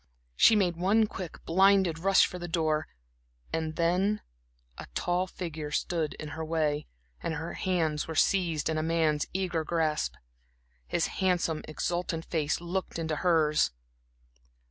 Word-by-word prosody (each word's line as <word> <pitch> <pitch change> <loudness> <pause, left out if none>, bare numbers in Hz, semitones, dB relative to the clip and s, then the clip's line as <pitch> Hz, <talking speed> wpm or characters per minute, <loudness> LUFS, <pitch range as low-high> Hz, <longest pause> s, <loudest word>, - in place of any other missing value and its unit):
She 225 - +6
made 180 -5 +2
one 205 +5 +3
quick, 185 -5 -8
blinded 190 -2 +4
rush 195 +3 +5
for 180 - -6
the 175 - -5
door, 160 -2 0 0.7
and 160 -1 -2
then, 180 +5 +1 0.6
a - - -7
tall 180 +1 0
figure 160 -5 -5
stood 155 +1 -1
in 155 - -7
her 160 +2 -5
way, 155 -2 0 0.3
and 160 - -2
her 160 +2 -5
hands 160 -5 0
were 160 - -5
seized 170 -3 +2
in 160 -1 0
a - - 0
man's 160 -2 +1
eager 180 -4 -1
grasp. 155 - 0 0.7
His - - +1 0.2
handsome, 175 -4 +1
exultant 165 +1 -2
face 155 -3 0
looked 175 +1 -3
into 160 -2 -2
hers. 160 -3 +3
165 Hz, 145 wpm, -29 LUFS, 155-180 Hz, 0.7 s, She